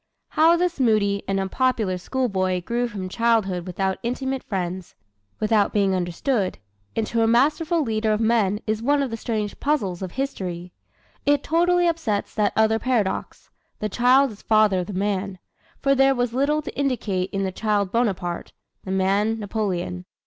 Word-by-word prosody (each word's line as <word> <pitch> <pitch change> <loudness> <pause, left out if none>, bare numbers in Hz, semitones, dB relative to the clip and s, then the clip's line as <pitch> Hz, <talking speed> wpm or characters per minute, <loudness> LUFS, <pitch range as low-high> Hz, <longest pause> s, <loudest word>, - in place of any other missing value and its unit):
How 325 +2 +4
this 350 -2 -1
moody 210 -5 +2
and 195 0 0
unpopular 195 -1 0
schoolboy 185 -5 -1
grew 240 +4 -1
from 200 -5 -5
childhood 195 -4 +1
without 190 +1 -2
intimate 265 +2 -2
friends 185 -2 -4 0.4
without 215 -1 +2
being 200 -2 +2
understood 185 +4 -1 0.4
into 225 +1 0
a 225 - +3
masterful 305 +7 +2
leader 220 -3 0
of 215 - +1
men 220 -3 +2
is 215 0 -1
one 285 +3 +2
of 260 - -3
the - - -2
strange 215 -2 -3
puzzles 205 - -1
of 185 -2 -5
history. 180 -10 -4 0.5
It 290 -1 +3
totally 350 +2 +3
upsets 320 -12 -1
that 210 -1 +1
other 220 0 +3
paradox, 230 -7 -2 0.3
"The 215 - -3
child 255 +4 +4
is 210 - -13
father 215 -3 +3
of 180 - -3
the 205 - -6
man," 195 0 -2 0.5
for 275 0 +4
there 270 0 +4
was 245 -1 -1
little 295 +4 +1
to - - -7
indicate 220 -9 -1
in 195 0 -2
the 190 - -1
child 205 -1 0
Bonaparte, 190 -7 -1 0.3
the - - -8
man 195 +4 +1
Napoleon. 190 -4 -3
215 Hz, 165 wpm, -23 LUFS, 190-255 Hz, 0.5 s, How